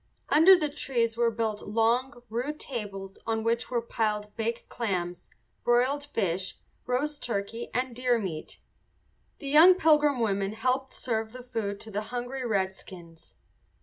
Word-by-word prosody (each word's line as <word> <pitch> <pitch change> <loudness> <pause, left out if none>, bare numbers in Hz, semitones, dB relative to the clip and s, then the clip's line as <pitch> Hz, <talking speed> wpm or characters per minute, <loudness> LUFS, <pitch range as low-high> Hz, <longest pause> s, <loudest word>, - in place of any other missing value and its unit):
Under 355 +5 +8
the 305 - 0
trees 235 -5 -1
were 235 0 +3
built 220 -2 -2
long, 240 +4 0
rude 255 +7 -3
tables 195 -6 -6
on 225 -1 0
which 230 +1 0
were 240 -2 -1
piled 210 -2 -2
baked 230 +1 -3
clams, 180 -6 -3 0.3
broiled 255 +4 +2
fish, 190 -8 -2 0.3
roast 290 +4 -1
turkey, 225 +1 -3
and 250 -1 -1
deer 250 -1 +2
meat. 175 -8 -5 0.8
The 280 - -7
young 325 +6 +8
Pilgrim 300 -5 +4
women 200 -3 0
helped 255 +4 -1
serve 220 -2 -2
the 255 0 -9
food 220 -5 -3
to 220 - -9
the 205 +1 -2
hungry 250 +2 -4
redskins. 190 -5 -4
230 Hz, 145 wpm, -28 LUFS, 210-255 Hz, 0.8 s, Under